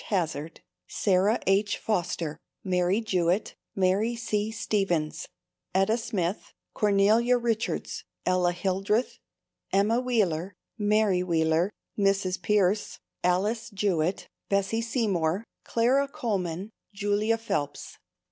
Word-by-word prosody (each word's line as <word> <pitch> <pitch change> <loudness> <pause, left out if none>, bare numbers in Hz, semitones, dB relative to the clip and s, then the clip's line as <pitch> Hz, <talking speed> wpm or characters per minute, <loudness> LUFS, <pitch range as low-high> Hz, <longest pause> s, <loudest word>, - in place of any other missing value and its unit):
Hazard, 165 -5 -2 0.3
Sarah 200 +3 +2
H. 200 +2 +2
Foster, 165 -6 -2 0.2
Mary 185 +2 +1
Jewett, 185 -2 0 0.2
Mary 195 +5 +2
C. 215 -2 -1
Stevens, 195 -8 -1 0.5
Etta 195 +4 +3
Smith, 215 -6 -3 0.2
Cornelia 210 +4 +3
Richards, 235 -2 -2 0.2
Ella 180 -1 +2
Hildreth, 195 +6 -1 0.5
Emma 210 +5 +3
Wheeler, 200 -8 0 0.2
Mary 210 -3 +2
Wheeler, 165 0 +2 0.3
Mrs. 195 -2 +1
Pierce, 205 +2 +1 0.3
Alice 205 +6 +1
Jewett, 190 -4 0 0.2
Bessie 200 +3 +1
Seymour, 205 -6 0 0.2
Clara 255 +5 +2
Coleman, 195 -6 -3 0.2
Julia 205 +2 +1
Phelps. 195 -11 -4
200 Hz, 95 wpm, -27 LUFS, 180-220 Hz, 0.5 s, Etta